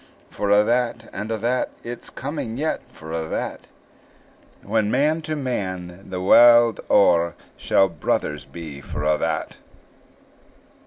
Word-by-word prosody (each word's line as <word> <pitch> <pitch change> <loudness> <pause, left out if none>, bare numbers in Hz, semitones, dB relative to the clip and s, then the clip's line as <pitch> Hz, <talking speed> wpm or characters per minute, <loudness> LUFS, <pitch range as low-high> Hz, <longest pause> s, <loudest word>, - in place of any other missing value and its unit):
For 100 - -2
a' 105 +1 +5
that, 120 0 0
and 105 +3 -5
a' 110 - -1
that, 120 +4 0
It's 120 0 -7
coming 130 -5 -5
yet, 155 +3 -1
for 80 0 -10
a' 80 -1 -2
that, - - -4 1.0
When 110 0 0
man 150 +7 +2
to 155 0 -3
man, 95 -9 -4
the 90 -1 -4
warld 120 +4 +6
o'er, 85 -4 +4 0.2
Shall 95 - +3
brothers 75 -3 -2
be 70 +1 -9
for 75 - -6
a' 75 0 +2
that! 80 0 -2
105 Hz, 140 wpm, -22 LUFS, 85-120 Hz, 1.0 s, warld